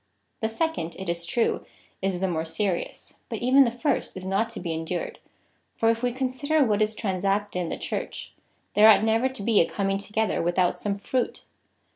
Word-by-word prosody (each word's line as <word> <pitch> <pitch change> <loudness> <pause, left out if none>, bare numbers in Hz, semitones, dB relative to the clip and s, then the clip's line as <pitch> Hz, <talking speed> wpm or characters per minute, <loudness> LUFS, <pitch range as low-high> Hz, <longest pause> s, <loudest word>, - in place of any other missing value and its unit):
The 220 - 0
second, 225 - -2
it 190 -2 -5
is 170 0 -2
true, 230 +6 +1 0.4
is 190 -2 -1
the 190 - +2
more 160 -3 -1
serious, 170 +3 -3 0.2
but - - -3
even 265 +3 +5
the - - +2
first 245 -3 -1
is 185 - -6
not 195 +4 +1
to 230 - -7
be 170 -2 -3
endured, 165 +2 -4 0.6
for 225 0 +3
if 230 0 -3
we 245 0 +1
con 260 +1 -1
sider 285 +4 +2
what 210 -2 +1
is 215 +1 +2
transacted 195 -1 -1
in 175 -2 -2
the - - -3
Church, - - -5 0.4
there 215 +1 +8
ought 215 - +7
never 225 +4 +2
to 260 -6 -8
be 220 -1 +4
a 165 - +1
comiiig 195 0 -1
together 220 +1 0
without 175 +1 +1
some 205 -1 -1
fruit. 240 +5 -2
205 Hz, 200 wpm, -26 LUFS, 185-230 Hz, 0.6 s, there